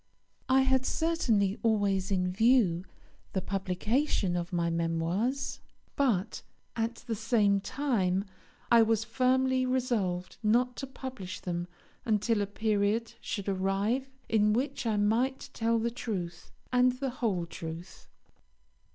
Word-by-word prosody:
I 265 +1 +5
had 265 -1 +3
certainly 235 - +1
always 205 -4 +1
in 180 -2 +1
view 200 -4 +3 0.5
the 190 - 0
publication 195 +2 0
of 175 0 -3
my 170 -1 0
Memoirs; 170 +11 -1 0.4
but, 220 -7 0 0.3
at 230 +1 -1
the 235 - -2
same 210 -2 +2
time, 200 -8 0 0.5
I 235 -1 +8
was 225 -1 +2
firmly 260 +2 +2
resolved 235 -9 -1
not 240 +3 +2
to 270 - -4
publish 260 -8 -7
them 175 -1 -3 0.4
until 215 0 +1
a 200 - -1
period 215 +2 0
should 200 -2 -4
arrive 200 +7 0 0.2
in 210 -1 +3
which 260 +1 -1
I 215 -2 +1
might 230 +6 +1
tell 230 0 +1
the 230 +1 0
truth, 180 -8 -5 0.2
and 250 0 +4
the 265 +1 -3
whole 190 -7 +1
truth. 170 +2 -8
220 Hz, 125 wpm, -30 LUFS, 190-250 Hz, 0.5 s, I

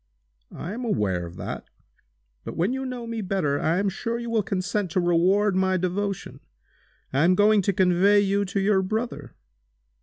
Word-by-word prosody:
"I 180 - -6
am 245 +3 -5
aware 95 - -1
of 85 - -12
that. - - -6 0.7
But, - - -7
when 180 +9 +1
you 265 0 -3
know 250 -2 -5
me 230 -1 -4
better, 180 -8 0
I 165 +2 +1
am 200 +1 +1
sure 230 +4 -2
you 235 0 -5
will 225 -2 +2
consent 195 0 -2
to 180 - 0
reward 185 +4 +3
my 190 0 +2
devotion. 190 +2 -3 0.7
I 135 +3 +3
am 180 +2 +4
going 210 +1 +4
to 195 - +1
convey 190 +2 +4
you 200 0 +1
to 200 +1 -2
your 195 0 +3
brother!" 190 - -4
195 Hz, 180 wpm, -25 LUFS, 175-210 Hz, 0.7 s, am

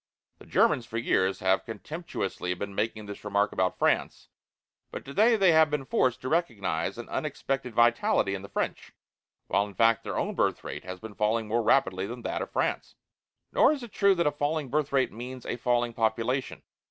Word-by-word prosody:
The - - -15
Germans 120 -3 +2
for 115 - -5
years 95 -4 +1
have 95 +1 +2
contemptuously 115 - -4
been 100 +2 -5
making 110 +1 -2
this 100 0 -9
remark 100 0 +1
about 95 0 0
France, - - 0 0.6
but - - -8
today 215 - +3
they 195 -5 +5
have 160 -1 +5
been 145 -2 -2
forced 125 -2 +1
to 130 - -5
recognize 115 - -1
an 120 - -7
unexpected 135 -4 -3
vitality 120 -4 +3
in 95 - -4
the 100 - -10
French, - - -3 0.5
while, 100 +1 +1
in 100 - -13
fact, 115 0 +3
their - - -4
own - - -1
birth - - 0
rate - - -6
has 90 0 -7
been 110 +1 -9
falling 110 +2 0
more 115 +2 +1
rapidly 95 -5 +2
than 120 +2 -7
that - - -2
of - - -4
France. - - -2 0.6
Nor - - +5
is 280 -4 -6
it 235 - -9
true 200 -1 +4
that 170 - +1
a 150 - +3
falling 145 -1 -2
birth 150 +2 0
rate 135 -2 +2
means 125 +3 -8
a - - -2
falling 120 -1 0
population. 115 +4 -1
120 Hz, 195 wpm, -28 LUFS, 100-140 Hz, 0.6 s, they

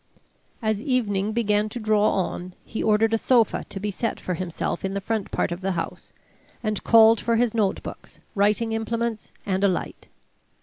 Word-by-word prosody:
As 215 -1 0
evening 215 -6 0
began 215 -2 +1
to 240 - -5
draw 215 -1 +3
on, 180 -1 -3
he 220 - -4
ordered 220 +1 +3
a 225 - +2
sofa 235 -3 +3
to 195 - -5
be 205 +1 -2
set 230 +3 -2
for 180 - -3
himself 170 -1 -3
in 195 0 -2
the - - 0
front 215 0 -2
part - - -1
of 175 +2 -4
the 190 0 -1
house, - - -5 0.5
and 215 -2 -1
called 225 -1 +6
for 230 - +1
his 235 -1 +2
notebooks, 210 -4 -3
writing 210 +2 +2
implements, 225 0 -2
and 190 -1 0
a - - +6
light. 185 - -3
215 Hz, 180 wpm, -24 LUFS, 195-225 Hz, 0.5 s, called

